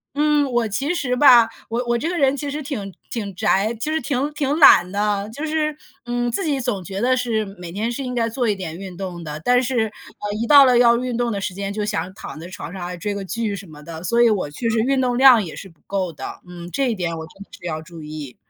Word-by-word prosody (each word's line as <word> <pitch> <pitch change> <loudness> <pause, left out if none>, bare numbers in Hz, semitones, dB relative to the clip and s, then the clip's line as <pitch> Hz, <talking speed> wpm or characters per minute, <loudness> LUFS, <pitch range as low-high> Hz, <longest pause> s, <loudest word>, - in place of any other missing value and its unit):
嗯， 295 -2 +2
我 240 -2 +1
其 270 - -1
实 250 -7 -1
吧， 250 -4 +7 0.2
我 235 +2 -1
我 240 - +2
这 310 +8 -2
个 355 - -2
人 275 -3 +3
其 285 +1 -4
实 295 +2 -4
挺 225 -9 -5 0.2
挺 215 -5 -4
宅， 195 +4 +2
就 265 +8 -3
是 315 0 0
挺 280 +1 -1
挺 290 0 -1
懒 185 - +7
的， 205 0 -1
就 290 +7 -5
是， 305 -1 -1 0.3
嗯， 240 0 -1
自 310 - -2
己 290 -4 0
总 205 -6 -2
觉 195 +2 -5
得 255 +4 +3
是 235 -4 -1
每 180 -4 -9
天 215 +6 -2
是 270 +3 -4
应 250 -1 -4
该 230 -1 +1
做 235 +1 -1
一 210 - +1
点 175 -5 -6
运 185 -2 -8
动 180 -3 -6
的， 150 -1 -6
但 245 0 +4
是， 245 -2 +1
呃， 205 -1 -8
一 230 - -1
到 285 0 +9
了 250 -2 +5
要 235 -1 +6
运 250 0 -3
动 240 0 0
的 200 - -2
时 195 - -3
间 200 +1 -4
就 210 0 -2
想 195 -4 -2
躺 155 - -8
在 165 - -8
床 180 -1 -8
上 190 - -7
啊， 180 - -5
追 205 +4 -3
个 200 -1 -4
剧 210 +2 -2
什 195 0 -9
么 150 -2 -13
的。 165 +1 -8
所 235 +5 +1
以 235 - +6
我 190 -8 -1
确 150 +11 -4
实 225 0 +1
运 265 +4 +2
动 250 -1 +1
量 255 -3 +7
也 160 - -8
是 195 - -9
不 165 - -24
够 190 -3 -2
的， 155 - -8
嗯， 175 -1 -9
这 270 +3 0
一 230 - -1
点 175 -4 -2
我 160 0 -7
真 195 +5 -13
的 - - -26
是 - - -12
要 155 -2 -3
注 165 0 -11
意。 150 -4 -8
225 Hz, 290 characters per minute, -21 LUFS, 185-255 Hz, 0.3 s, 到